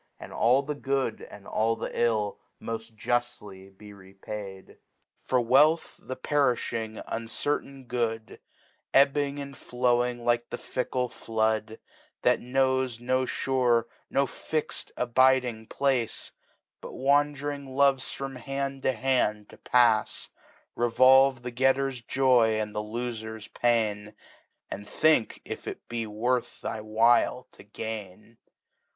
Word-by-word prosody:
And - - -10
all 125 +4 +3
the 150 +1 -3
Good 135 -5 -2
and 100 -1 -12
all 115 +3 +1
the - - -9
111 110 -3 0 0.2
moil 115 -1 -4 0.2
juftly 105 -5 -3
be 105 0 -12
repadif. 95 0 -9 0.5
For. 130 - +1
Wealth, 145 +7 +3
th^perifhine, 125 -5 -1
uncertain 135 +3 -3
Good^ 115 -2 -3 0.6
Ebbing 140 +1 +4
and 140 -1 -7
flowing 125 -1 0
like 120 0 +1
the - - -4
£ckle 125 0 -2
Flood, 110 0 -1 0.5
That - - +4
knows 130 -1 0
no 130 +2 +1
fure, 125 -3 +1 0.3
no 140 - +2
fix'd 155 +3 -4
abiding 125 -2 +2
Place, 130 -5 -1 0.5
But - - -9
wsmd'nng 145 +1 +1
loves 135 0 +2
from 135 -1 -6
Hand 135 +2 -4
to 130 - +1
Hand 110 -4 0
to - - -14
pafs; 120 -3 +2 0.4
Revolve 130 +2 +5
the 125 - -4
Getter's 135 +1 +1
Joy 120 -3 +3
and 105 -1 -3
Lofer's 110 0 -5
t^ain, 110 -3 0 0.6
.And 105 +1 -7
think 155 -7 +2
if - - -7
it - - -7
be 115 -2 -3
worth 120 +4 -1
thy 110 - -4
while 115 +3 +2
to - - -16
gain. 110 +1 -8
120 Hz, 120 wpm, -27 LUFS, 110-135 Hz, 0.6 s, Revolve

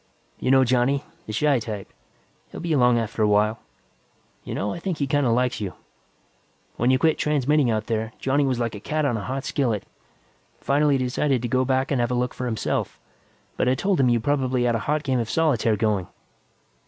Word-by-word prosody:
"You - - -1
know 135 0 +6
Johnny; 130 +3 +1 0.2
the - - -4
shy 140 +4 +2
type. 105 - -7 0.6
He'll - - -8
be 170 -1 -1
along 125 -4 +4
after 115 -1 -2
a 105 - +4
while. 105 +2 +2 0.8
You - - -5
know, 100 +1 -2
I - - -6
think 180 -2 -3
he 140 - 0
kinda 140 -2 +1
likes 125 -1 +1
you; 100 -3 -4 1.0
when 120 - +1
you 130 - +4
quit 160 +4 +2
transmitting 150 -2 +2
out 110 -1 -1
there, 110 0 -2
Johnny 140 +2 +1
was 130 -3 0
like 115 -1 -2
a 105 - -7
cat 155 +7 -1
on 120 - +1
a 110 - -3
hot 130 +3 -4
skillet. 120 -8 -1 0.8
Finally 145 0 +2
decided 130 0 0
to - - 0
go 130 +2 +1
back 130 +2 0
and 135 -3 +2
have 120 - 0
a 125 - 0
look 125 0 -1
for 125 - -4
himself, 110 -2 -2 0.6
but - - +2
I 130 - +3
told 195 +3 0
him 130 -2 +4
you 120 -1 +3
probably 130 -1 0
had 120 -1 +2
a 115 - 0
hot 150 0 +1
game 130 -3 0
of 115 -1 -2
solitaire 125 -9 +2
going. 105 -4 0
125 Hz, 210 wpm, -24 LUFS, 115-140 Hz, 1.0 s, know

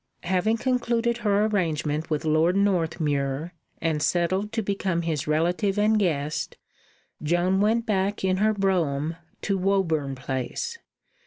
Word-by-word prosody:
Having 190 +5 +1
concluded 235 -1 0
her 210 -2 +2
arrangement 160 -7 -1
with 155 0 -1
Lord 160 +3 +3
Northmuir, 160 -5 0 0.3
and 160 -2 0
settled 185 +6 +1
to 225 - -1
become 190 -3 -1
his 155 -3 -2
relative 175 +6 +1
and 215 +1 +3
guest, 150 -6 -1 0.6
Joan 175 +5 +2
went 225 +2 +2
back 200 -1 0
in 185 0 +2
her 215 +2 +3
brougham 165 -6 0 0.3
to 195 -2 0
Woburn 165 -8 +1
Place. 130 - -4
180 Hz, 130 wpm, -25 LUFS, 155-205 Hz, 0.6 s, Lord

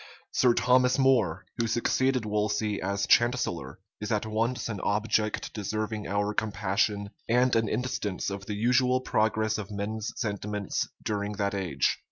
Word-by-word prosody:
Sir 125 -2 +4
Thomas 125 0 +4
More, 120 -11 +2
who 115 - +1
succeeded 125 +2 +1
Wolsey 105 0 0
as 100 +1 -1
chancellor, 120 -7 +2 0.2
is 105 +2 -4
at 105 -1 +1
once 115 +2 -1
an 110 -4 -4
object 105 0 0
deserving 110 +1 -3
our 100 +1 0
compassion, 100 -1 0 0.2
and 125 +1 +3
an 115 -1 +2
instance 110 -5 -2
of 100 0 -6
the 105 - -3
usual 125 +3 +3
progress 110 -2 +1
of 105 -1 -6
men's 105 +2 -3
sentiments 105 -3 -2 0.2
during 105 0 -1
that 100 -1 -1
age. 95 -4 0
110 Hz, 145 wpm, -28 LUFS, 100-120 Hz, 0.2 s, Sir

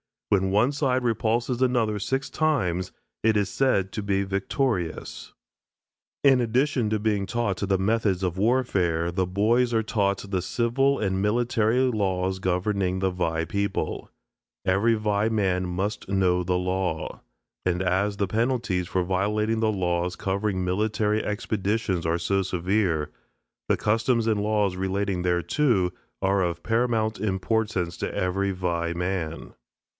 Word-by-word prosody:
When 95 -2 +2
one 105 +7 +3
side 130 -3 0
repulses 120 +2 0
another 115 -5 +2
six 135 +7 -2
times 95 - 0 0.3
it 110 0 +3
is 100 -2 +1
said 100 -8 +1
to 105 - -4
be 100 -1 0
victorious. 100 - -2 0.9
In 135 -2 +6
addition 125 0 +1
to 110 0 0
being 105 -2 0
taught 115 -5 -1
the 95 0 +1
methods 100 -1 +1
of 90 -1 -1
warfare, 95 -7 +1
the 95 +1 0
boys 115 +6 +2
are 110 - +2
taught 100 -2 -1
the 95 -2 0
civil 125 +7 +1
and 95 -2 -1
military 115 +2 +1
laws 95 -6 0
governing 95 0 0
the 95 0 0
Vai 80 -2 -1
people. 100 +1 -2 0.6
Every 100 +5 +3
Vai 105 0 +1
man 95 -4 0
must 95 +4 -3
know 90 -2 +2
the 90 0 0
law. 90 -3 -2 0.5
And 90 0 +1
as 95 +3 +1
the 100 - 0
penalties 110 -4 0
for 95 0 0
violating 105 +4 0
the 110 -1 +2
laws 90 -2 -1
covering 95 -1 -1
military 105 +3 0
expeditions 105 -3 -1
are 85 +1 +1
so 95 +3 0
severe, 90 -3 0 0.6
the - - +2
customs 115 +2 +1
and 110 -2 +1
laws 105 -3 +1
relating 95 0 -1
thereto 90 - +1 0.3
are 95 +1 +2
of 85 -1 -2
paramount 115 -2 0
importance 95 -3 -1
to - - -3
every 95 +2 0
Vai 85 -2 -1
man. 85 -3 -3
100 Hz, 140 wpm, -25 LUFS, 90-110 Hz, 0.9 s, In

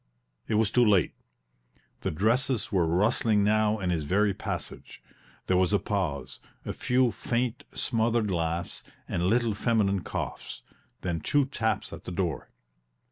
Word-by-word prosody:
It 110 - 0
was 110 -1 +2
too 125 - +4
late; 100 -7 +3 0.9
the - - -2
dresses 115 - +1
were 90 -5 +2
rustling 105 +4 +2
now 110 +1 +3
in 90 -3 -1
his 80 -3 -1
very 100 +6 +2
passage; - - -6 0.5
there 90 - +2
was 95 +2 +2
a - - +6
pause, 75 -12 -3 0.3
a - - -3
few 125 -1 +2
faint, 120 +3 -2
smothered 115 -3 +1
laughs 85 0 -2 0.2
and 85 +1 0
little 115 +1 +2
feminine 105 -3 +1
coughs - - -5 0.4
then 85 -3 -2
two 145 - +2
taps 110 -6 -2
at - - -9
the - - -5
door. 90 -3 -2
105 Hz, 145 wpm, -28 LUFS, 90-115 Hz, 0.9 s, a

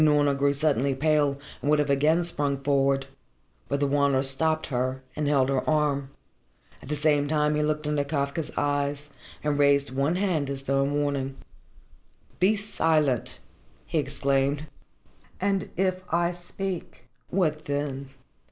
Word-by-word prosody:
Unorna 145 -2 +4
grew 140 +1 +2
suddenly 140 -2 +1
pale, 145 -1 +2 0.2
and 145 - -1
would 150 - +5
have 145 -1 +1
again 155 +5 +3
sprung 145 -5 -1
forward. 135 0 +1 0.6
But 140 - 0
the 145 - +2
Wanderer 140 -1 +2
stopped 155 +4 +1
her 130 +1 -1
and 150 -1 -1
held 135 -2 +3
her 135 -2 +1
arm. 145 -3 +1 0.7
At - - -12
the 150 - 0
same 145 -1 +2
time 150 0 +2
he 150 - +1
looked 150 0 -1
into 150 -1 +1
Kafka's 140 +1 -2
eyes 145 0 -1 0.3
and 150 -1 0
raised 140 -2 +3
one 140 +5 +1
hand 180 -7 0
as 135 -1 -5
though 135 0 +1
in 140 - -1
warning. 140 -2 -1 1.0
"Be 190 +5 +4
silent!" 155 - 0 0.5
he - - 0
exclaimed. 140 +2 0 0.7
"And 195 0 0
if 185 0 +1
I 170 +1 +2
speak, 180 +1 -6 0.2
what 155 -5 0
then?" 140 -1 -3
145 Hz, 150 wpm, -26 LUFS, 140-155 Hz, 1.0 s, would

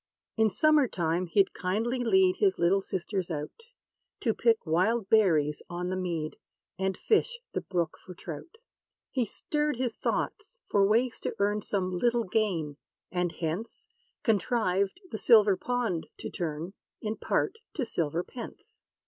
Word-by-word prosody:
In 220 -1 +4
summer 300 +5 +4
time 175 -2 -1
he'd 195 +3 +3
kindly 220 +7 -1
lead 375 +7 +4
His 400 -3 +3
little 185 +3 +3
sisters 190 -1 -3
out, 150 -2 -3 0.7
To 225 - +2
pick 230 -2 +2
wild 190 +6 +1
berries 160 -9 +4
on 175 +1 -3
the - - 0
mead, 170 -4 -3 0.4
And 190 0 0
fish 475 +2 +2 0.2
the - - -1
brook 170 -4 -2
for 180 - -10
trout. 170 - -8 0.6
He 255 -3 +1
stirred 300 +7 -1
his 245 -2 -2
thoughts 425 +4 -2
for 200 -1 +4
ways 235 +3 +2
to - - -3
earn 205 +1 +1
Some 185 -3 -1
little 240 +1 +2
gain; 180 -8 -1 0.3
and 180 -1 0
hence, 170 +8 -4 0.4
Contrived 200 - +1
the 220 - -4
silver 215 -4 +6
pond 230 -5 -1
to - - -6
turn. 165 +2 -4 0.3
In 215 0 -3
part, 445 - 0 0.2
to 270 - -1
silver 165 -3 -1
pence. 240 +4 -10
200 Hz, 150 wpm, -29 LUFS, 175-235 Hz, 0.7 s, silver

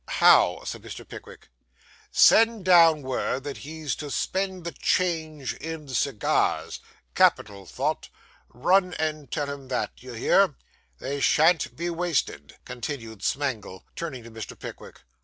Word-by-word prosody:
'How?' - - +4
said - - -6
Mr. - - -10
Pickwick. - - -12 0.6
'Send 225 -3 +5
down 165 -5 +6
word 130 0 -2
that 145 -1 -6
he's 155 -2 -5
to 150 - -6
spend 190 +7 -2
the 170 - -4
change 160 -7 -1
in 160 -1 -7
cigars. 130 -3 0 0.3
Capital 100 -3 +2
thought. - - -3 0.4
Run 180 +7 +2
and 155 -2 -3
tell 145 - -1
him 140 -1 -7
that; 125 -1 -2
d'ye 125 -1 -10
hear? 185 +6 +3 0.4
They 140 - -4
shan't 160 +4 +3
be 170 +1 -3
wasted,' 160 - -2
continued 120 -4 -6
Smangle, 120 -9 -3
turning 140 -8 -5
to 115 - -12
Mr. 110 -1 -8
Pickwick. - - -10
145 Hz, 135 wpm, -25 LUFS, 125-170 Hz, 0.6 s, down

